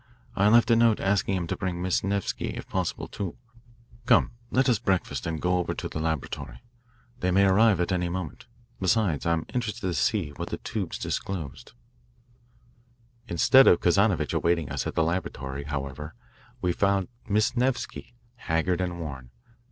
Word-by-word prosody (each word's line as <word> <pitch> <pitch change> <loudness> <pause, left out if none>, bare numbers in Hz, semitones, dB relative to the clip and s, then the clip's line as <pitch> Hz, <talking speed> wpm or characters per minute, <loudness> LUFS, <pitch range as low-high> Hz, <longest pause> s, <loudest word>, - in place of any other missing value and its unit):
I 100 +1 +3
left 115 +2 +5
a - - +7
note 115 -1 +4
asking 95 -1 +1
him 90 - -2
to - - -2
bring 90 -3 -3
Miss 90 0 0
Nevsky, 100 0 -2
if - - -7
possible, - - -2
too. 95 -4 -5 0.7
Come, - - +5 0.2
let 130 +1 +2
us 120 -6 +3
breakfast 95 -3 -1
and 80 -1 -2
go 90 +3 +1
over 90 - -2
to - - -4
the - - -5
laboratory. 75 -5 -3 0.6
They 90 - 0
may 100 +2 +4
arrive 100 0 +4
at 90 - 0
any 90 -1 0
moment. 85 -5 -5 0.3
Besides, 95 -5 +1
I'm 85 -1 +1
interested 115 -3 -2
to 95 -2 -1
see 80 - 0
what - - -4
the - - -3
tubes 100 -6 -4
disclose." 80 -9 -4 1.6
Instead 130 +10 +6
of 85 - +6
Kazanovitch 100 +2 +2
awaiting 85 -5 +1
us - - -2
at - - -5
the 80 - +3
laboratory, 70 -5 -3
however, 70 +1 -5 0.5
we 90 - +1
found 100 0 +1 0.2
Miss 110 +5 +2
Nevsky, 125 -1 -2 0.2
haggard 85 -1 0
and 90 -1 -3
worn. 70 -6 -7
90 Hz, 165 wpm, -27 LUFS, 80-100 Hz, 1.6 s, a